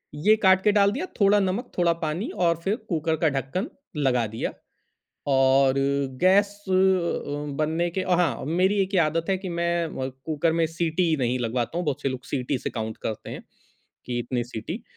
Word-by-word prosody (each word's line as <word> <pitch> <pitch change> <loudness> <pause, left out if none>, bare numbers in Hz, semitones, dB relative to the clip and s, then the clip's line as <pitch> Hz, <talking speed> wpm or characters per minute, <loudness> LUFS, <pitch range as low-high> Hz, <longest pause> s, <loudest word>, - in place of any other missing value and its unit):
ये 210 +9 +4
काट 190 0 +6
के 210 - +5
डाल 200 -1 +4
दिया 290 - -3
थोड़ा 205 +1 +5
नमक 195 +6 -2
थोड़ा 170 -1 +3
पानी 160 +8 -2 0.2
और 170 0 +3
फ़िर 200 +3 +1
कुकर 160 -1 0
का 160 - +5
ढक्कन 140 - -3 0.3
लगा 125 -5 +2
दिया। 110 +2 -4 0.8
और 135 0 +4 0.5
गैस 195 +3 +5 0.2
अ, - - 0 0.9
बनने 160 +3 0
के 190 - -2
हाँ, 170 -10 +1
मेरी 185 +5 +2
एक 195 +1 -4
ये 180 - +5
आदत 165 +1 0
है 190 - +2
कि 190 -1 -6
मैं 170 0 0
अ, 130 -4 -4 0.2
कुकर 160 +1 +1
में 165 -1 +2
सीटी 165 0 0
नहीं 125 +1 0
लगवाता 120 +6 -2
हूँ। 175 - -2
बहुत 145 - -2
से 135 - +1
लोग 130 -1 -5
सीटी 130 0 -2
से - - -4
काउंट 110 -2 -4
करते 110 - -4
हैं - - -7 0.6
कि 120 -1 -2
इतनी 120 0 -2
सीटी। 125 - -6
165 Hz, 190 wpm, -25 LUFS, 135-185 Hz, 0.9 s, काट